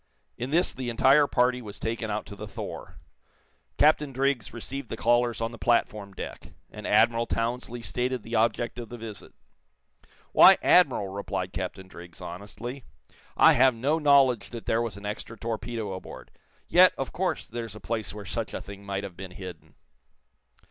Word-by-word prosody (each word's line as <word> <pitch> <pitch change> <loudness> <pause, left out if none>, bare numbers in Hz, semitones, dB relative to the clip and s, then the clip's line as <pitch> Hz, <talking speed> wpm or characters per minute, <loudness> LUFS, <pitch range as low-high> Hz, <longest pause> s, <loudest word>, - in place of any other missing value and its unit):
In 125 +2 -4
this 170 +5 +2
the 130 -2 -4
entire 135 +5 +5
party 125 -1 +2
was 105 -3 -8
taken 115 0 -3
out 105 0 -2
to 100 - -10
the - - -8
"Thor." - - -7 0.8
Captain 150 -1 +4
Driggs 135 -3 0
received 125 +2 -6
the 115 - -5
callers 120 -1 +2
on 115 0 -1
the 115 - -11
platform 105 -4 +1
deck, - - -8 0.2
and 105 - -7
Admiral 115 +2 +3
Townsley 120 +1 -3
stated 125 -1 -2
the 115 - -9
object 115 +1 +1
of 115 -2 -7
the 120 - -7
visit. 110 -3 -9 1.0
"Why, - - +8
Admiral," 100 - +4
replied 95 -2 -4
Captain 95 +1 -5
Driggs, 85 -2 -12
honestly, 105 +8 -7 0.5
"I - - +7
have 130 0 +5
no 140 +8 +1
knowledge 140 -5 +4
that 115 -2 -8
there 115 - +1
was 115 -5 -3
an 100 - -10
extra 105 +2 -6
torpedo 115 -1 -4
aboard. 95 - -9 0.4
Yet, - - +6
of - - -4
course, - - -1
there's 115 -2 -6
a - - -9
place 110 -3 -3
where 105 0 -8
such 110 +3 -4
a - - -4
thing 100 0 -10
might 100 0 -3
have 95 -3 -7
been 95 +1 -8
hidden." 90 0 -10
115 Hz, 175 wpm, -27 LUFS, 100-125 Hz, 1.0 s, Why